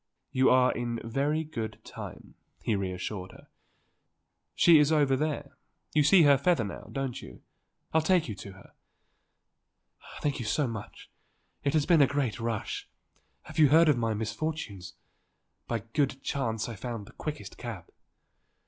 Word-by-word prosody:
"You 130 0 +4
are 125 0 +5
in 120 -1 -3
very 140 +7 0
good 115 -8 -5
time," - - -9 0.3
he 110 - +1
reassured 95 0 -4
her. - - -17 1.1
"She 170 -3 +7
is 150 +1 +4
over 145 -4 +4
there 145 0 -3 0.4
you 155 - +4
see 170 +4 +6
her 140 -2 +6
feather 140 -4 +2
now, 100 - -7
don't 135 -3 -3
you. - - -12 0.5
I'll 160 - +4
take 175 +1 +2
you 110 - -4
to 100 0 -9
her." 95 - -17 1.5
"Thank 145 -1 0
you 120 - -4
so 145 +7 +1
much. 115 -3 -8 0.5
It 140 - +1
has 150 -2 +3
been 165 -2 +5
a 140 - +6
great 135 -6 -1
rush. 115 -2 -3 0.6
You 155 - +5
have 140 - +3
heard 165 0 +7
of 140 -5 +3
the 115 -2 0
misfortunes? 110 - -4 0.7
By 115 -2 -1
good 135 -2 0
chance 115 -6 -1
I 120 - -6
found 115 0 -5
the - - -14
quickest 150 -1 -6
cab." 110 -9 -7
130 Hz, 155 wpm, -29 LUFS, 110-150 Hz, 1.5 s, She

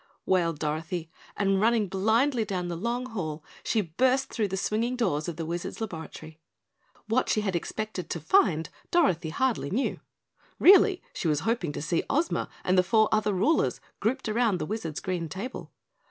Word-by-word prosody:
wailed 170 -4 +2
Dorothy, 160 +2 -3 0.3
and 195 -1 +2
running 225 -1 +3
blindly 220 +7 +2
down 185 -4 -3
the 170 - -3
long 235 +7 -2
hall 160 -10 -5 0.2
she 220 - +1
burst 255 +10 +1
through 215 -3 0
the 190 0 -3
swinging 225 +5 0
doors 155 -12 0
of 170 - -3
the 165 - -4
Wizard's 170 +2 -4
laboratory. 160 -5 -7 0.7
What 230 +3 +1
she 215 - +2
had 195 -3 -1
expected 210 +2 -4
to 170 - -3
find 160 - +3 0.2
Dorothy 185 - +2
hardly 245 - 0
knew. 245 +8 -1 0.6
Really, 385 0 +6
she - - -2
was 150 -2 +1
hoping 225 -6 0
to - - -5
see 165 +1 +1
Ozma 325 +4 0
and 185 0 +3
the - - +5
four 220 +3 +3
other 215 -1 +2
rulers 250 - +2 0.2
grouped 250 +5 -1
around 220 -2 +2
the - - -3
Wizard's 170 -6 -4
green 175 -3 -3
table. 205 +11 -6
195 Hz, 170 wpm, -27 LUFS, 165-235 Hz, 0.7 s, Really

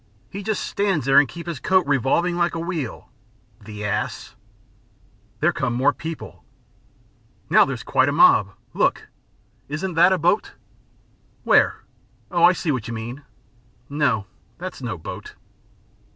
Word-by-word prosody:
He 200 - -6
just 210 0 -2
stands 195 -6 -1
there 135 0 +6
and 145 - +3
keeps 170 0 -9
his 165 -6 -4
coat 185 +4 +2
revolving 145 +6 +1
like 175 -1 0
a - - -3
wheel. 165 -8 -5 0.5
The 105 -1 -7
ass!" 100 - -3 1.1
"There - - +3
come 120 - -2
more 135 +4 +3
people." 160 +3 -8 1.1
"Now - - +7
there's - - -5
quite - - +2
a - - 0
mob. - - +5 0.2
Look! - - 0 0.6
Isn't 160 +6 -4
that 170 +3 +5
a 190 - +3
boat?" 175 +5 +1 0.9
"Where? - - +3 0.5
Oh, 175 -2 +1
I 175 +1 +8
see 170 -3 -2
where 130 -4 -1
you 120 -1 -6
mean. 115 +5 -6 0.7
No, 135 -8 0 0.3
that's 180 -4 -7
no 115 -7 -4
boat." 80 - -9
160 Hz, 145 wpm, -22 LUFS, 130-175 Hz, 1.1 s, I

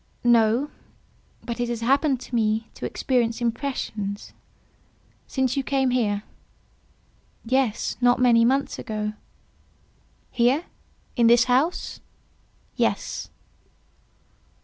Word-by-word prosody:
"No: 240 +4 +3 0.7
but 235 -1 -5
it 240 0 -1
has 235 -1 -3
happened 270 +2 +2
to - - -12
me 220 -1 +1
to - - -5
experience 235 -3 0
impressions—" 230 -4 -3 0.9
"Since 260 -2 0
you 275 - +1
came 265 -1 +1
here?" 210 -5 0 1.2
"Yes; 255 -2 0
not 245 0 +4
many 235 -2 +5
months 270 +4 +1
ago." 215 -1 -3 1.2
"Here?—in 245 -2 -1
this 235 0 +6
house?" 260 +8 0 0.8
"Yes." - - -1
240 Hz, 95 wpm, -24 LUFS, 230-265 Hz, 1.2 s, this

